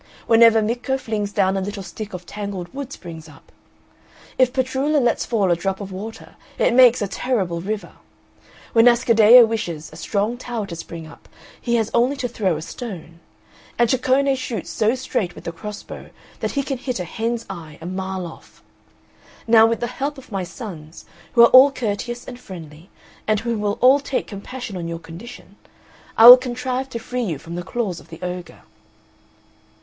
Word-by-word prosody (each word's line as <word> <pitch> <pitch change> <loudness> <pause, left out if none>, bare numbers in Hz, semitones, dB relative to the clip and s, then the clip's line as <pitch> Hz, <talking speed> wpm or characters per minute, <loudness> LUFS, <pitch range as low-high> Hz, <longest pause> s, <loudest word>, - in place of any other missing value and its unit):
Whenever 225 -1 +6
Micco 245 +4 -1
flings 215 -5 -3
down 195 -2 +1
a 195 - -1
little 200 +1 -5
stick 215 +3 -8
a 185 - -4
tangled 185 +1 -7
wood 275 -1 -6
springs 160 - -10
up. 145 - -18 0.9
If 255 -1 +4
Petrullo 265 +3 0
lets 240 -3 0
fall 205 -6 +1
a - - +4
drop 190 +3 -3
of 200 -2 -7
water 215 +4 -9 0.2
it - - +2
makes 245 -3 +6
a - - -1
terrible 190 -6 -2
river. 210 +3 -4 0.8
When 230 +1 +6
Ascaddeo 235 -1 +7
wishes 175 -9 -4
a - - -10
strong 205 +7 -2
tower 235 -4 -4
to 175 - -7
spring 165 0 -8
up 155 - -15 0.3
he 235 -1 0
has 225 -2 0
only 245 +4 +2
to 255 -2 -3
throw 195 -8 -1
a 155 - -7
stone; 170 -6 -8 0.6
and 240 - +4
Ceccone 265 +2 +2
shoots 255 -3 -5
so 220 +3 +1
straight 215 -8 -3
with - - -11
the 170 - -4
cross 210 +5 -8
bow - - -10 0.3
that - - -3
he 280 - 0
can 270 -2 -4
hit 255 -4 -3
a - - -2
hen's 230 +4 -3
eye 160 -5 -9
a 165 - -10
mile 190 0 -4
off. 165 - -13 0.8
Now 225 -1 +6
with 230 0 -1
the - - 0
help 275 +4 -4
of 265 - -14
my 195 -2 -2
sons, 175 -5 -9 0.3
who 235 - +7
are 235 - +8
all 265 +2 +9
courteous 240 0 -4
and 245 -1 -8
friendly, 165 -6 -11 0.4
and 215 -1 +1
who 235 0 -2
will 205 0 -1
all 260 +3 +6
take 275 -2 -3
compassion 225 +2 -8
on 170 -1 -5
your 170 0 -4
condition, 185 +4 -12 0.6
I 225 - +8
will 245 +1 +13
contrive 255 +1 -3
to 235 - -5
free 250 +2 -4
you 180 -10 -2
from 165 +4 -10
the 175 - -4
claws 190 -2 -3
of - - -18
the 165 - -10
ogre." 180 0 -6
220 Hz, 190 wpm, -21 LUFS, 185-245 Hz, 0.9 s, will